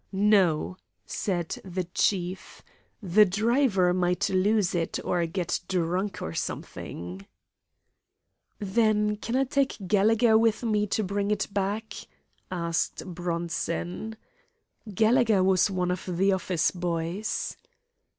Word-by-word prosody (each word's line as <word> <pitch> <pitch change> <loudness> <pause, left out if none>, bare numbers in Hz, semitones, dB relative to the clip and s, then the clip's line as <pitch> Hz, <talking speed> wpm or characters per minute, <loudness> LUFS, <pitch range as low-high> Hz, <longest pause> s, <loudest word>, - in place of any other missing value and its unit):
"No," 190 -4 +2 0.3
said 175 -5 -3
the 185 -1 -3
chief; 180 +1 -2 0.4
"the 200 +3 +6
driver 210 -2 +2
might 180 0 +1
lose 195 0 +2
it, 170 -2 -1
or 175 -1 +1
get 175 0 -2
drunk, 185 +2 -1
or 80 - -4
something." 90 +3 -6 1.3
"Then 210 +1 +1
can 230 +3 -4
I 265 - +3
take 275 0 0
Gallegher 220 +3 +4
with 225 +1 +2
me 210 -2 +1
to 215 - 0
bring 200 +1 -1
it 210 -1 +1
back?" 205 +3 -2 0.6
asked 170 -2 -2
Bronson. 175 +3 -3 0.7
Gallegher 220 -1 +3
was 190 +1 +3
one 180 -2 -1
of 180 - -3
the 185 +2 +2
office 185 -4 0
boys. 175 +3 -3
190 Hz, 110 wpm, -27 LUFS, 175-215 Hz, 1.3 s, the